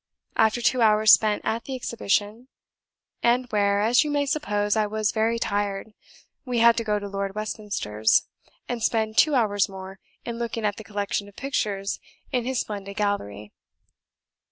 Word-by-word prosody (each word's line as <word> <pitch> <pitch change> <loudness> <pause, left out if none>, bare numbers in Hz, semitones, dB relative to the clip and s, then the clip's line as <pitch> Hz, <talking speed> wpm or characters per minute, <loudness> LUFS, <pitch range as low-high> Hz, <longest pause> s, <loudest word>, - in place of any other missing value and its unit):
After 225 +2 +2
two 255 +1 +2
hours 215 0 +5
spent 210 -1 +3
at 230 +1 -2
the 265 - -4
Exhibition, 225 -1 -1 0.7
and 245 +2 +3
where, 200 -1 +2
as 235 +6 +4
you 300 - -3
may 290 -1 +1
suppose, 210 -8 0
I 215 -1 +2
was 215 0 0
VERY 225 +1 +1
tired, 205 -1 -2 0.5
we 250 -3 -3
had 235 0 +6
to 230 - 0
go 210 -1 0
to 205 0 -5
Lord 195 0 -4
Westminster's, 205 - 0 0.4
and 245 -2 -3
spend 220 -1 0
two 305 +3 +4
hours 205 -4 +2
more 190 0 -9 0.3
in 235 0 -5
looking 230 -2 -3
at 205 -1 0
the 220 - -8
collection 205 -1 -3
of 200 - -20
pictures 205 -7 -2 0.3
in 250 -3 0
his 260 -1 0
splendid 200 -1 -6
gallery." 105 - -2
215 Hz, 165 wpm, -25 LUFS, 200-235 Hz, 0.7 s, had